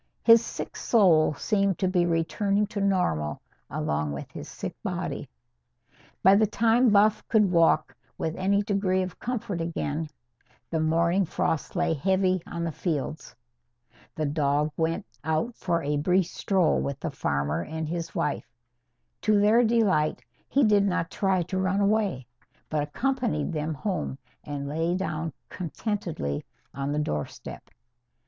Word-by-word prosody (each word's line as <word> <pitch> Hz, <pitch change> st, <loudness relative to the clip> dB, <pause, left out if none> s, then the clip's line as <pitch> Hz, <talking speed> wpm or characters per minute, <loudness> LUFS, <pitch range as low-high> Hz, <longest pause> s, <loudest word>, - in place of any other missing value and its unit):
His 230 Hz, 0 st, +7 dB
sick -, -, -6 dB
soul 170 Hz, -9 st, +4 dB
seemed 200 Hz, +1 st, +1 dB
to 190 Hz, -, +1 dB
be 180 Hz, -2 st, +2 dB
returning 195 Hz, +5 st, +1 dB
to 200 Hz, -, -2 dB
normal 180 Hz, -, 0 dB, 0.3 s
along 75 Hz, 0 st, -1 dB
with 70 Hz, -, -7 dB
his -, -, -8 dB
sick -, -, -6 dB
body. -, -, -4 dB, 0.9 s
By 190 Hz, -, +8 dB
the 210 Hz, +2 st, +4 dB
time 230 Hz, +3 st, +3 dB
Buff 210 Hz, +1 st, +4 dB
could 210 Hz, -4 st, +3 dB
walk 165 Hz, -6 st, +3 dB, 0.2 s
with 160 Hz, 0 st, -2 dB
any 200 Hz, +2 st, +1 dB
degree 195 Hz, -2 st, +1 dB
of 185 Hz, -2 st, -7 dB
comfort 215 Hz, -7 st, -3 dB
again, 160 Hz, -2 st, -2 dB, 0.6 s
the 165 Hz, -, 0 dB
morning 170 Hz, +4 st, +2 dB
frost 160 Hz, -2 st, -2 dB
lay 175 Hz, -2 st, +1 dB
heavy 185 Hz, +3 st, +1 dB
on 170 Hz, -1 st, -4 dB
the 165 Hz, -, -1 dB
fields. 155 Hz, -1 st, -3 dB, 0.8 s
The 155 Hz, -, -1 dB
dog 145 Hz, 0 st, +1 dB
went 165 Hz, +5 st, -1 dB, 0.2 s
out 160 Hz, +10 st, -1 dB
for 170 Hz, -2 st, -1 dB
a 145 Hz, +1 st, 0 dB
brief 180 Hz, +5 st, +2 dB
stroll 185 Hz, 0 st, +1 dB
with 140 Hz, 0 st, -3 dB
the 165 Hz, -, -3 dB
farmer 75 Hz, -, -1 dB
and 160 Hz, 0 st, -4 dB
his 170 Hz, +1 st, -4 dB
wife. 150 Hz, -, -2 dB, 0.7 s
To 215 Hz, -2 st, +3 dB
their 215 Hz, +4 st, +5 dB
delight, 210 Hz, -10 st, +2 dB, 0.3 s
he 280 Hz, -, +3 dB
did 205 Hz, -3 st, +5 dB
not 180 Hz, -3 st, -1 dB
try 190 Hz, -3 st, +1 dB
to 185 Hz, +2 st, -3 dB
run 190 Hz, +1 st, +1 dB
away, 200 Hz, -, +1 dB, 0.5 s
but 155 Hz, -1 st, +1 dB
accompanied 195 Hz, -, -1 dB
them 155 Hz, 0 st, -2 dB
home 155 Hz, -4 st, -3 dB, 0.3 s
and 145 Hz, -1 st, -5 dB
lay 165 Hz, +4 st, 0 dB
down 165 Hz, -4 st, -2 dB, 0.2 s
contentedly 175 Hz, -, -3 dB, 0.3 s
on 140 Hz, +1 st, -3 dB
the 150 Hz, -, -1 dB
doorstep. 75 Hz, -, -4 dB
175 Hz, 145 wpm, -27 LUFS, 155-200 Hz, 0.9 s, By